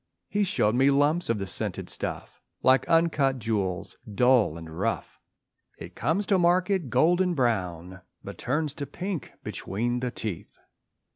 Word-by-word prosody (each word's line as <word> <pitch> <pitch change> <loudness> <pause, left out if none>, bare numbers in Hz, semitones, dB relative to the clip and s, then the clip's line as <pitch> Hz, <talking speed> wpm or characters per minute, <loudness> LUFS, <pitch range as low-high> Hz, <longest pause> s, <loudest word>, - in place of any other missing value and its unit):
He 205 0 +1
showed 110 - +1
me 135 +3 +4
lumps 145 +4 +2
of 115 - +2
the 100 - -3
scented 95 - -2
stuff - - -4 0.2
Like 130 0 +4
uncut 155 -5 +3
jewels, 100 -6 -2
dull 125 -6 +3
and 80 -1 -9
rough. - - -2 0.6
It - - -10
comes 180 +7 0
to 195 -2 +2
market 180 -2 +2
golden 175 +8 +3
brown; 95 - -1 0.2
But - - -9
turns 150 +2 -1
to 140 -2 -4
pink 180 +1 -5
between 120 +5 -2
the 125 0 -2
teeth. 110 -7 -6
130 Hz, 145 wpm, -27 LUFS, 110-170 Hz, 0.6 s, me